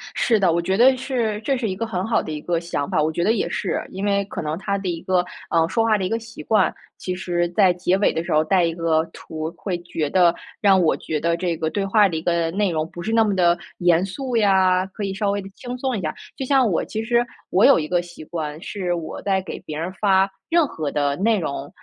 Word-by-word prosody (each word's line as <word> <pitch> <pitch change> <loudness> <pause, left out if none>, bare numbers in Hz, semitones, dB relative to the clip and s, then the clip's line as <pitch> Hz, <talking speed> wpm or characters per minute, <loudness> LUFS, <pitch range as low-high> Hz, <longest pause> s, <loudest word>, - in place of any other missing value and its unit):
是 225 -3 +2
的， 185 -3 +3
我 170 - +1
觉 190 +3 0
得 260 +3 +6
是 240 -5 -2
这 265 +4 0
是 240 -2 -2
一 185 - -3
个 230 - -3
很 185 -4 -2
好 225 - +1
的 - - -6
一 150 - -4
个 170 +1 -1
想 165 -4 -3
法， 155 - +1
我 155 +1 +1
觉 170 +2 -1
得 210 - +3
也 225 - -1
是， 190 - -2
因 190 +2 -4
为 200 -1 +2
可 - - -6
能 155 0 -3
他 200 +1 -2
的 195 -1 -5
一 165 -1 -3
个， 180 -1 +1 0.2
呃， 165 -1 +3
说 225 +7 +1
话 220 -1 +3
的 190 - -2
一 - - -2
个 225 - -1
习 230 0 -10
惯。 215 -4 +2 0.3
其 185 - -3
实 175 -1 -1
在 185 0 +4
结 180 +1 +1
尾 205 - +2
的 165 - -2
时 - - -5
候 155 - +4
带 185 +1 +3
一 165 -1 +1
个 165 -1 +1
图 155 0 -6
会 185 -4 -3
觉 165 -3 -3
得 175 0 +4 0.3
让 195 -3 +5
我 160 - +3
觉 155 - -3
得 170 +2 +1
这 170 -1 -2
个 160 - -1
对 200 +3 -2
话 205 +1 +4
的 170 - -4
一 160 - -2
个 170 -1 +1
内 200 +1 0
容 160 -1 -2
不 175 - -8
是 220 - -2
那 225 0 +4
么 205 -2 0
地 175 -2 +3 0.2
严 175 0 +3
肃 250 +5 -3
呀， 190 -3 +3
可 195 +2 -7
以 195 -1 -2
稍 200 +1 0
微 200 0 -1
地 195 - -10
轻 250 0 -6
松 255 -2 -1
一 - - -4
下。 155 -3 -2 0.2
就 265 - -3
像 265 -3 +3
我 165 - 0
其 220 0 -4
实 240 +1 +2 0.2
我 190 - +4
有 - - +7
一 155 - -3
个 175 -1 +2
习 175 -2 -11
惯 155 -1 -5
是 185 -2 -3
我 170 -2 -5
在 195 -1 +1
给 190 - -7
别 155 -5 -7
人 165 +4 -3
发 195 -1 +3 0.2
任 335 -1 +4
何 155 - -4
的 145 -1 0
内 220 +3 +2
容， 140 -3 -4
185 Hz, 290 characters per minute, -22 LUFS, 170-210 Hz, 0.3 s, 有